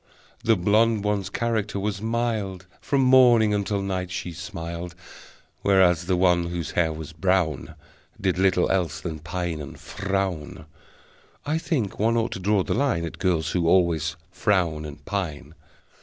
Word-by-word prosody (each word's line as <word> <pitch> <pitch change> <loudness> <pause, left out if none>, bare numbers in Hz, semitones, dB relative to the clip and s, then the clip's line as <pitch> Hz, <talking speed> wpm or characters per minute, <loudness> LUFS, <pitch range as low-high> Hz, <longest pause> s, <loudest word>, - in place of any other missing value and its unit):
The 115 -1 +4
blonde 105 +3 +2
one's 100 -2 -1
character 110 -2 -1
was 100 0 -2
mild, 110 -5 -2 0.2
From 140 -1 +1
morning 120 -4 +6
until 100 -1 -1
night 95 -2 -2
she 90 -1 -4
smiled, 85 0 -6 0.7
Whereas 90 -3 +3
the 90 -1 +2
one 90 -2 +3
whose 85 -3 -4
hair 80 -2 +1
was 80 0 -7
brown 90 -2 0 0.4
Did 95 -1 0
little 95 -2 +3
else 90 -5 0
than 80 -3 -5
pine 85 0 -4
and 70 - -9
frown. 95 -7 -3 0.8
(I 155 +2 0
think 130 - -2
one 115 +2 +2
ought 115 0 0
to - - -5
draw 100 +1 +2
the - - -2
line 115 -10 +1
At 80 - -8
girls 90 -4 +1
who 85 -2 0
always 85 -4 +2 0.2
frown 90 -7 0
and 75 -1 -10
pine!) 80 -6 -4
95 Hz, 155 wpm, -25 LUFS, 85-105 Hz, 0.8 s, morning